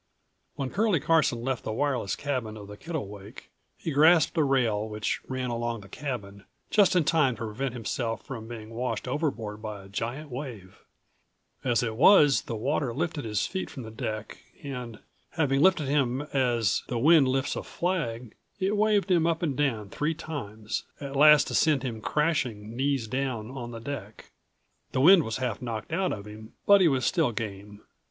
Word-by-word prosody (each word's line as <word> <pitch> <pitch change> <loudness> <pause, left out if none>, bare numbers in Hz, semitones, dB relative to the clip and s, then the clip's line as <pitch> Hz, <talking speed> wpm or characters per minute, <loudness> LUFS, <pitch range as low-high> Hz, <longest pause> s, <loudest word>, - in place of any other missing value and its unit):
When 135 -3 -3
Curlie 205 -5 +2
Carson 145 -7 +2
left 130 -1 -2
the - - -3
wireless 125 -4 -1
cabin 125 -7 -3
of 100 -1 -10
the 105 - -9
Kittlewake, 105 - -7 0.3
he 165 - -4
grasped 160 +3 +5
a 160 - +3
rail 115 -6 +1
which 105 0 -2
ran 130 -1 -3
along 120 -1 -2
the 100 - -13
cabin, 100 -6 -6 0.3
just 200 -3 +4
in 180 - +4
time 150 -5 +2
to 115 - -5
prevent 125 +4 -3
himself 115 0 -3
from 115 -4 -7
being 115 -2 -8
washed 125 +2 -3
overboard 125 -7 -2
by 105 -3 -6
a - - -13
giant 125 +9 -4
wave. 120 -8 -7 0.8
As 120 -2 +2
it 115 -2 -2
was, 145 - +6
the 115 - -5
water 130 +1 -1
lifted 155 -2 -2
his 105 -2 0
feet 190 -1 -4
from 130 - -8
the 110 - -8
deck 110 0 -5 0.2
and, 125 -5 -6 0.4
having 140 -4 +1
lifted 185 -4 +4
him 135 -1 +1
as 120 -7 +2
the 120 - -2
wind 150 +2 +6
lifts 130 +1 0
a - - -3
flag, 125 - -3 0.3
it 195 +2 +1
waved 205 -2 +2
him 170 -2 +4
up 170 +1 0
and 145 -5 0
down 120 -8 -1
three 155 +2 -1
times, 110 -9 -5 0.2
at 140 -1 -6
last 150 +1 +7
to - - -5
send 150 -5 +3
him 115 -4 -4
crashing, 120 -7 -1
knees 135 -2 0
down, 125 -2 -3
on 120 -3 -6
the 115 -1 -7
deck. 115 -5 -7 0.6
The 130 - +1
wind 180 +5 +8
was 110 -6 -3
half 125 -4 -3
knocked 115 +3 -5
out 185 +1 +1
of 100 -1 -5
him, 110 +1 -11
but 200 -1 +7
he 180 - +6
was 135 -4 +1
still 160 -8 +2
game. 105 -1 -6
130 Hz, 185 wpm, -27 LUFS, 110-150 Hz, 0.8 s, wind